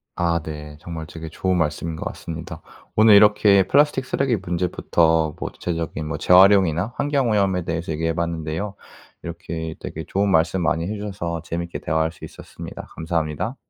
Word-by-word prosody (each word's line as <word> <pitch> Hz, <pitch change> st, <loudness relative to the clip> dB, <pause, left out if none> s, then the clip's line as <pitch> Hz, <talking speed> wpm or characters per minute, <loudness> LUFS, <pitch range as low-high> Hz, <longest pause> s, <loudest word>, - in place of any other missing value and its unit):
아 85 Hz, -1 st, +1 dB
네 75 Hz, -1 st, -8 dB
정말 80 Hz, 0 st, -7 dB
좋은 80 Hz, 0 st, -10 dB
되게 95 Hz, +3 st, -1 dB
말씀인 80 Hz, 0 st, -1 dB
것 -, -, -6 dB
같습니다. 80 Hz, -1 st, -7 dB, 0.3 s
오늘 110 Hz, -1 st, +7 dB
이렇게 105 Hz, -1 st, +6 dB
플라스틱 145 Hz, -2 st, +3 dB
쓰레기 130 Hz, -1 st, 0 dB
문제부터 85 Hz, -3 st, +1 dB
뭐 -, -, -3 dB
구체적인 80 Hz, -3 st, -4 dB
재활용이나 95 Hz, +2 st, +5 dB
환경오염에 105 Hz, -10 st, +1 dB
대해서 80 Hz, 0 st, -3 dB
이야기해 80 Hz, +1 st, -1 dB
봤는데요. 85 Hz, +3 st, -3 dB, 0.5 s
이렇게 80 Hz, -1 st, -5 dB
되게 80 Hz, -, -6 dB
좋은 100 Hz, +5 st, 0 dB
말씀 90 Hz, +1 st, +2 dB
많이 80 Hz, 0 st, 0 dB
해주셔서 95 Hz, -5 st, -4 dB
재미있게 85 Hz, +1 st, -4 dB
대화할 80 Hz, +1 st, 0 dB
수 -, -, -11 dB
있었습니다. -, -, -10 dB
감사합니다. 80 Hz, -, -2 dB
85 Hz, 400 characters per minute, -22 LUFS, 80-100 Hz, 0.5 s, 오늘